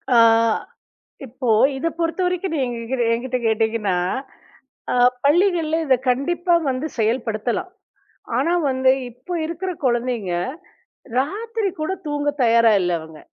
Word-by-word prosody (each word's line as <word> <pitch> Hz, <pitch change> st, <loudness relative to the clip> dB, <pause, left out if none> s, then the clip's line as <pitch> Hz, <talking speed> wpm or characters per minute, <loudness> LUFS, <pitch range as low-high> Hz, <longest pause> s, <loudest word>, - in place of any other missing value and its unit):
ஆ. -, -, +7 dB, 1.1 s
இப்போ 255 Hz, 0 st, -4 dB, 0.3 s
இத 310 Hz, +5 st, -1 dB
பொறுத்த 330 Hz, +2 st, -1 dB
வரைக்கும் 360 Hz, 0 st, -1 dB
நீங்க 255 Hz, -4 st, -1 dB
என்கி 230 Hz, +3 st, -3 dB
என்கிட்ட 250 Hz, +2 st, -1 dB
கேட்டீங்கன்னா, 220 Hz, -3 st, +1 dB, 0.9 s
ஆ. -, -, +1 dB, 0.3 s
பள்ளிகள்ல 330 Hz, 0 st, +3 dB
இத 265 Hz, -, +4 dB
கண்டிப்பா 345 Hz, +7 st, +1 dB
வந்து 265 Hz, +4 st, -2 dB
செயல்படுத்தலாம். 225 Hz, -, -1 dB, 0.7 s
ஆனா 335 Hz, -, +1 dB, 0.2 s
வந்து 260 Hz, 0 st, +3 dB, 0.2 s
இப்போ 250 Hz, +10 st, -10 dB
இருக்கற 340 Hz, +3 st, -4 dB, 0.2 s
கொழந்தைங்க 240 Hz, -6 st, -1 dB, 0.8 s
ராத்திரி 430 Hz, -, -1 dB
கூடத் 380 Hz, +3 st, -3 dB
தூங்க 290 Hz, 0 st, 0 dB
தயாரா 230 Hz, -1 st, +5 dB
இல்ல 175 Hz, -1 st, 0 dB
அவுங்க. 160 Hz, -1 st, -12 dB
260 Hz, 115 wpm, -21 LUFS, 230-335 Hz, 1.1 s, ஆ